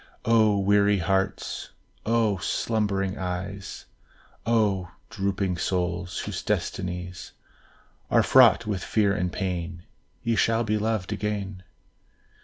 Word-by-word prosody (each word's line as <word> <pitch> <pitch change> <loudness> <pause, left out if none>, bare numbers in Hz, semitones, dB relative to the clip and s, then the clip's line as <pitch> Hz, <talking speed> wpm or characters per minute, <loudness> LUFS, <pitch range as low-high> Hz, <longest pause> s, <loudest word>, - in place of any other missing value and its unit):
O 110 -3 +4
weary 100 +1 +3
hearts! 95 +1 -1 0.3
O 110 -4 +2
slumbering 100 -1 -1
eyes! 95 +1 -5 0.6
O 105 -6 +2 0.2
drooping 95 -2 -1
souls, 90 0 -2
whose - - -4
destinies 90 -1 -3 0.8
Are - - +4
fraught - - +6
with 100 -4 -2
fear 105 -3 +2
and 90 -3 -1
pain, 85 -3 -3 0.4
Ye 115 -1 +1
shall 115 +2 +2
be 110 -1 0
loved 110 -2 -1
again! 100 -2 -3
100 Hz, 105 wpm, -26 LUFS, 90-105 Hz, 0.8 s, fraught